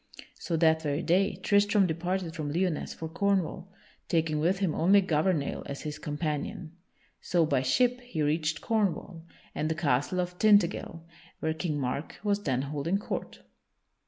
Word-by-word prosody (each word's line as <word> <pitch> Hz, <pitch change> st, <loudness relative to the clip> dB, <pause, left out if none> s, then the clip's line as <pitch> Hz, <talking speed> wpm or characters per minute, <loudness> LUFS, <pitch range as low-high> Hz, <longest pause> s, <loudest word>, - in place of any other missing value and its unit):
So 170 Hz, -, -2 dB
that 160 Hz, -1 st, +4 dB
very 150 Hz, +1 st, -1 dB
day 190 Hz, +3 st, +2 dB
Tristram 205 Hz, 0 st, +4 dB
departed 175 Hz, +1 st, -2 dB
from 155 Hz, -3 st, -4 dB
Lyonesse 175 Hz, 0 st, -1 dB
for 160 Hz, -, -5 dB
Cornwall, 190 Hz, +1 st, -1 dB, 0.4 s
taking 160 Hz, -3 st, +1 dB
with 175 Hz, +5 st, +2 dB
him 190 Hz, -5 st, 0 dB
only 195 Hz, +5 st, +5 dB
Gouvernail 160 Hz, -4 st, 0 dB
as 140 Hz, -, -6 dB
his 150 Hz, -1 st, -5 dB
companion. 155 Hz, +3 st, -4 dB, 0.5 s
So, 170 Hz, -2 st, +2 dB
by 140 Hz, -4 st, +1 dB
ship, 245 Hz, -, +2 dB
he 215 Hz, -11 st, -3 dB
reached 155 Hz, +1 st, 0 dB
Cornwall, 195 Hz, -6 st, -1 dB, 0.3 s
and 155 Hz, -, -1 dB
the 160 Hz, -, 0 dB
castle 150 Hz, +2 st, 0 dB
of 180 Hz, 0 st, -3 dB
Tintagel, 205 Hz, -5 st, +3 dB, 0.4 s
where 160 Hz, 0 st, -1 dB
King 160 Hz, -2 st, -2 dB
Mark 135 Hz, +3 st, -3 dB
was 205 Hz, -1 st, +1 dB
then 130 Hz, -7 st, 0 dB
holding 150 Hz, +6 st, -1 dB
court. 205 Hz, -, -5 dB
165 Hz, 155 wpm, -29 LUFS, 155-190 Hz, 0.5 s, only